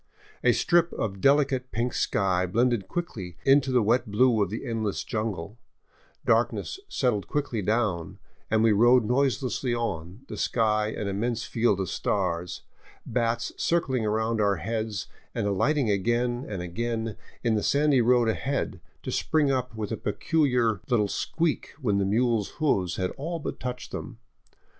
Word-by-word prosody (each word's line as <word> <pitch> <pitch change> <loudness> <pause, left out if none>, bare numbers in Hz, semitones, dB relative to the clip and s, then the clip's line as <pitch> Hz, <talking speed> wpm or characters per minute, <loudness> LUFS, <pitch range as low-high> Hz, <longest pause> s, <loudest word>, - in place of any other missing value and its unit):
A - - +6
strip 170 -1 +3
of 100 -3 -3
delicate 135 -2 +3
pink 120 +2 -1
sky 95 -2 +1
blended 115 0 +1
quickly 115 - -5
into 135 -1 +4
the 125 -3 +3
wet 115 +1 +2
blue 115 +1 +3
of 100 - +1
the 110 - -5
endless 110 -3 -2
jungle, 105 -2 -4 0.7
darkness 385 - +1
settled 115 -7 0
quickly 140 -7 -1
down, 100 -5 -1 0.3
and 110 0 +3
we 115 - +5
rode 120 +3 +5
noiselessly 130 0 0
on, 95 -3 -4
the - - -7
sky 110 -2 +1
an 105 -1 -4
immense 110 +4 -1
field 115 -4 +1
of 95 - -1
stars, 85 +1 -2 0.4
bats 115 -1 -1
circling 135 -8 +1
around 110 +1 0
our 100 -1 +3
heads 110 +2 -3 0.3
and - - -1
alighting 115 +5 +1
again 120 +5 0
and 95 -4 -4
again 110 +4 -3 0.3
in 115 -2 +2
the 105 - +1
sandy 140 0 +3
road 120 0 +4
ahead, 110 -5 -2 0.2
to - - -4
spring 150 -3 +2
up 125 -3 -2
with 110 -2 -4
a - - -2
peculiar 125 - +1
little 105 -4 +3
squeak 165 +9 -2
when 105 -8 +1
the 100 - +1
mule's 115 0 +1
hoofs 95 - +1
had 95 -1 -1
all 165 +5 -3
but 155 - -5
touched 125 0 -5
them. 120 - -6
115 Hz, 155 wpm, -27 LUFS, 100-125 Hz, 0.7 s, A